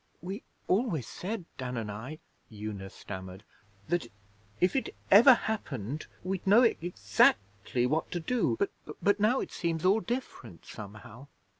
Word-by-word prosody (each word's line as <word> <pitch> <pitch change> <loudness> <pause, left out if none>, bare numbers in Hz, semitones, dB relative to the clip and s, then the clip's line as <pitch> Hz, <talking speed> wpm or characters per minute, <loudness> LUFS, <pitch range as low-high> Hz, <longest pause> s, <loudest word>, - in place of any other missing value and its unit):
'We 190 +7 -6 0.3
always 185 - +1
said, 195 -1 -5
Dan 125 -1 -3
and 110 -2 -3
I,' 120 +9 -7 0.3
Una 105 -2 -6
stammered, 95 0 -8 0.4
'that 175 -5 0 0.5
if 180 +1 +3
it 270 - -1 0.2
ever 240 +6 +10
happened 150 - -4 0.2
we'd 190 +1 -3
know 215 +6 +7
ex 175 -6 -2
actly 100 +5 +3
what 155 +5 0
to 175 - -2
do; 185 - +1
but 200 - 0 0.3
but 205 +1 +2
now 220 +6 +3
it - - -5
seems 165 -1 -2
all 195 +4 +5
different 225 - -5
somehow.' 105 +5 -10
160 Hz, 145 wpm, -30 LUFS, -, 0.5 s, ever